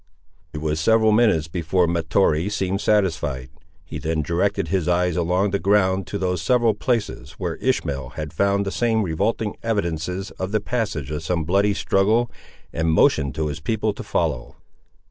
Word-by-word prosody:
It 75 - -6
was 80 0 -1
several 110 +5 +4
minutes 105 -9 +3
before 85 +2 0
Mahtoree 85 +1 +1
seemed 100 -1 -1
satisfied. 75 -11 0 0.3
He - - -6
then 80 -1 -1
directed 90 +2 0
his 90 -2 0
eyes 90 0 +1
along 90 +3 +1
the 100 - 0
ground 95 0 +2
to 100 - -3
those 90 -3 -1
several 120 +4 +3
places 115 0 -2
where - - -4
Ishmael 70 -3 -1
had 75 -1 -5
found 100 +4 +1
the 95 - -2
same 115 -1 +1
revolting 100 +5 -1
evidences 90 -3 -2
of 95 +1 -3
the 110 - +2
passage 100 - -3
of 75 0 -3
some 85 +1 -1
bloody 100 +5 +2
struggle, 110 +6 +2 0.4
and 80 0 0
motioned 70 -3 +3
to 80 - -1
his 75 +1 -4
people 110 +5 -1
to - - -8
follow. 75 -8 -2
95 Hz, 165 wpm, -22 LUFS, 80-105 Hz, 0.4 s, several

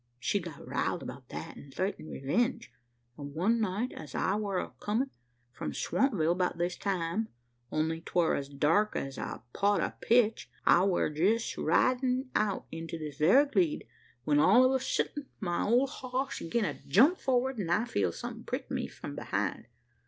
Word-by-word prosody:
She 120 - 0
got 170 -5 -9
riled - - -1
'bout - - -9
that, - - -7
an' 140 - -12
thraitened 185 +1 -3
revenge; 230 - -1 0.5
an' 140 0 -7
one 220 +8 +2
night, 215 +5 -1
as 150 -4 -9
I 190 - +1
war 200 -3 -2
comin' 240 +6 -1 0.4
from - - -5
Swampville, 175 - +1
'bout 180 -2 0
this 175 +1 -1
time 190 +2 -1 0.4
only 160 +1 0
'twar 170 0 +1
as 140 0 -2
dark 160 +9 +2
as 135 -1 -3
a - - -5
pot 200 0 +2
o' - - -1
pitch 230 -2 +3 0.2
I 175 - +6
war 180 -5 +1
jest 200 +10 +1
ridin' 255 0 +1
out 210 -2 0
into 165 +1 -5
this 150 -3 -7
very 220 - +6
gleed, 190 - +1 0.4
when 145 +2 +3
all 210 +11 +6
o' 255 +1 +4
a 265 - +2
suddint 285 +2 -2
my 175 -4 -1
ole 245 +5 +4
hoss 260 0 -3
gin 210 +7 0
a - - -4
jump 285 - +5
forrard, 260 -1 +1
an 180 -5 -2
I 210 +7 +2
feeled 235 - 0
somethin' - - -6
prick - - -4
me - - -1
from - - -8
behind. - - -2
200 Hz, 175 wpm, -30 LUFS, 165-245 Hz, 0.5 s, I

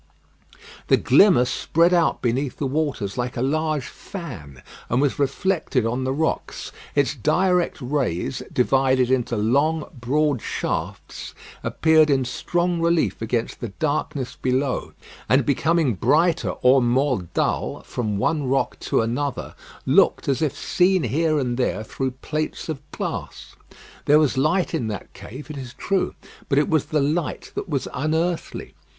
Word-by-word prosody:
The - - +5
glimmer 180 -11 +5
spread 170 +7 +2
out 170 -2 +2
beneath 125 +2 -1
the 145 - -2
waters 135 -7 -2
like 125 0 -3
a 120 - 0
large 155 0 0
fan, 90 - -9 0.3
and 125 - +2
was 145 0 +1
reflected 140 - 0
on 125 +3 -1
the 130 - 0
rocks. 160 +4 -2 0.2
Its 140 -2 +2
direct 180 - +1
rays, 125 - -2
divided 130 0 +2
into 120 -3 +1
long, 140 +9 +1
broad 140 +1 +1
shafts, - - -4 0.3
appeared 160 -1 +4
in 135 -2 +2
strong 175 +7 -1
relief 170 -5 +1
against 115 +1 -2
the 120 - -4
darkness 145 +2 -2
below, 130 +1 -1 0.4
and 130 -1 +4
becoming 155 0 +2
brighter 160 - +2
or 130 +1 +6
more 125 -1 +2
dull - - -1
from 110 -4 -3
one 145 +7 0
rock 135 +1 0
to - - +1
another, 125 +5 -2 0.3
looked - - +3
as 135 +1 +1
if 150 -4 0
seen 185 -1 +2
here 155 +6 +1
and 125 -4 -1
there 125 -4 0
through 130 +4 -3
plates 155 +6 -4
of 150 -3 -4
glass. - - -6 0.5
There 150 - +6
was 155 -3 +2
light 160 +8 +1
in 150 -9 -1
that 105 -3 -6
cave 145 +6 -9
it 150 - -7
is 130 -3 -8
true; 195 -2 -1 0.3
but 135 - +2
it 145 - +3
was 155 -3 +2
the 150 -2 0
light 150 +3 -2
that 200 - -5
was 140 -4 -1
unearthly. 160 +4 -2
140 Hz, 150 wpm, -23 LUFS, 125-155 Hz, 0.5 s, or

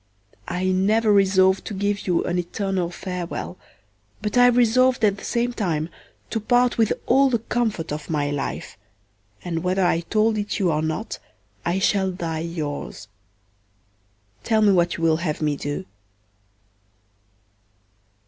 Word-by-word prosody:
I 180 +1 -2
never 210 +4 +3
resolv'd 190 -1 +4
to 210 - -5
give 200 +1 -1
you 175 -2 +2
an 180 +1 -1
eternal 185 0 -2
farewell, 180 0 -5 0.6
but 210 +1 -3
I 245 0 +7
resolv'd 245 0 +4
at 200 -1 +2
the - - -12
same 240 +1 -1
time 165 -8 -1 0.4
to 225 - 0
part 245 +2 +2
with 220 -2 +3
all 270 +2 +4
the 240 - +2
comfort 220 -8 -2
of 150 0 -5
my 145 -2 0
life, 145 -7 -4 0.7
and 165 -2 -2
whether 185 +1 +1
I 165 - +2
told 215 +5 +1
it 205 0 -2
you 185 -4 +2
or 155 0 0
not 160 +8 -3 0.4
I 175 +2 0
shall 195 -1 +2
die 165 -3 -4
yours. 150 - -5 1.3
Tell 220 - +2
me 205 - +6
what 175 -2 +2
you 165 - -5
will 160 -1 +4
have 160 -3 -2
me 150 -2 0
do. 145 +6 -4
190 Hz, 150 wpm, -23 LUFS, 165-220 Hz, 1.3 s, I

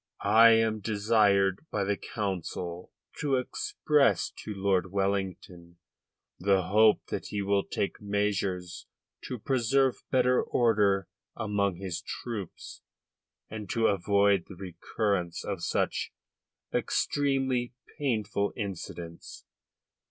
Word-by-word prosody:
"I 110 +3 +7
am 110 -1 +2
desired 100 -2 +2
by 105 - -1
the 100 +1 0
Council 90 -4 -4 0.3
to 140 -2 +1
express 150 - +1
to 110 - -7
Lord 95 -2 0
Wellington 95 -3 -3 0.6
the 95 0 +3
hope 110 +2 +5
that - - -4
he 100 -1 -3
will 100 0 +2
take 100 - -3
measures 100 -4 -2 0.4
to 125 - -4
preserve 130 +2 +1
better 125 -1 +3
order 105 -5 +2 0.3
among 100 -3 0
his 90 -2 -5
troops 105 -8 -7 0.7
and 105 -3 -7
to 115 -1 +1
avoid 100 -1 +3
the 95 - -10
recurrence 90 0 -2
of 95 -4 -4
such - - -1 0.6
extremely 135 -3 0 0.2
painful 110 -7 0
incidents." 90 -5 -7
100 Hz, 105 wpm, -29 LUFS, 95-115 Hz, 0.7 s, I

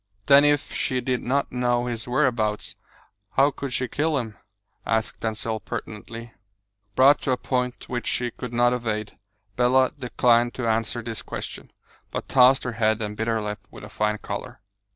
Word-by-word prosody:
"Then 140 0 +7
if 145 -1 +2
she 130 - 0
did 125 0 -1
not 140 +3 0
know 120 -1 +1
his 120 -2 -4
whereabouts, 120 -5 0 0.6
how 140 +2 +4
could 140 -1 -5
she 125 0 -1
kill 150 +3 0
him?" 110 -5 -3 0.5
asked 110 -1 -1
Denzil 110 0 -2
pertinently. 115 +2 -7 0.6
Brought 140 +3 +6
to - - -3
a - - 0
point 125 -1 -2
which 120 -1 -3
she 120 -1 0
could 125 +1 -7
not 120 +1 +3
evade, 110 -4 -3 0.4
Bella 130 +1 +4
declined 120 -1 +2
to 125 -2 -2
answer 115 +1 0
this 115 -1 -5
question, - - -7 0.4
but - - -5
tossed 130 +1 +5
her 120 - -2
head 110 -1 +1
and 105 -1 -3
bit 110 +2 -2
her 115 -1 +1
lip, 105 0 -4
with - - -12
a - - -9
fine 105 0 0
colour. - - -6
120 Hz, 170 wpm, -25 LUFS, 110-130 Hz, 0.6 s, Then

